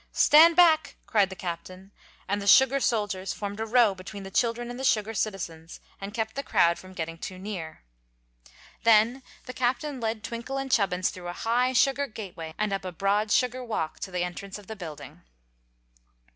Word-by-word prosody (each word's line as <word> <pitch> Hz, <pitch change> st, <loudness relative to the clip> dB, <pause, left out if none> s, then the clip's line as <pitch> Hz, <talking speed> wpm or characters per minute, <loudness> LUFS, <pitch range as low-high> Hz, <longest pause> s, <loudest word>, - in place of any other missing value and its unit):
"Stand 325 Hz, +3 st, +7 dB
back!" 320 Hz, -4 st, +4 dB
cried 205 Hz, -4 st, +2 dB
the 190 Hz, -, -8 dB
Captain, 185 Hz, +2 st, -7 dB, 0.4 s
and 200 Hz, +1 st, -1 dB
the 200 Hz, -, -5 dB
sugar 265 Hz, +5 st, +6 dB
soldiers 205 Hz, -6 st, -1 dB
formed 205 Hz, 0 st, -6 dB
a 225 Hz, -, -2 dB
row 230 Hz, -3 st, +4 dB
between 195 Hz, +2 st, -9 dB
the 190 Hz, -, -9 dB
children 240 Hz, +3 st, 0 dB
and 245 Hz, -, -8 dB
the -, -, -5 dB
sugar 220 Hz, -4 st, +1 dB
citizens, 175 Hz, -6 st, -4 dB, 0.2 s
and 195 Hz, +1 st, -5 dB
kept 220 Hz, -1 st, -2 dB
the 275 Hz, -, -2 dB
crowd 170 Hz, -10 st, +2 dB
from 185 Hz, 0 st, -13 dB
getting 165 Hz, -1 st, -5 dB
too 185 Hz, -, -7 dB
near. 185 Hz, -, -7 dB, 1.0 s
Then 230 Hz, +3 st, +4 dB, 0.2 s
the 250 Hz, -, -7 dB
Captain 255 Hz, +3 st, -1 dB
led 220 Hz, -2 st, -3 dB
Twinkle 235 Hz, +4 st, -5 dB
and 270 Hz, -1 st, -4 dB
Chubbins 185 Hz, -5 st, +1 dB
through 180 Hz, -1 st, -9 dB
a 175 Hz, -, -4 dB
high 245 Hz, +6 st, 0 dB
sugar 275 Hz, +2 st, +2 dB
gateway 175 Hz, -8 st, -8 dB
and 210 Hz, -1 st, -1 dB
up 195 Hz, -, -2 dB
a 185 Hz, -, -5 dB
broad 200 Hz, +4 st, 0 dB
sugar 255 Hz, 0 st, +1 dB
walk 215 Hz, -10 st, -3 dB
to -, -, -5 dB
the 180 Hz, -1 st, -2 dB
entrance 190 Hz, +3 st, -6 dB
of 205 Hz, -, -13 dB
the 220 Hz, -, -7 dB
building. 165 Hz, -7 st, -9 dB
210 Hz, 185 wpm, -27 LUFS, 185-245 Hz, 1.0 s, Stand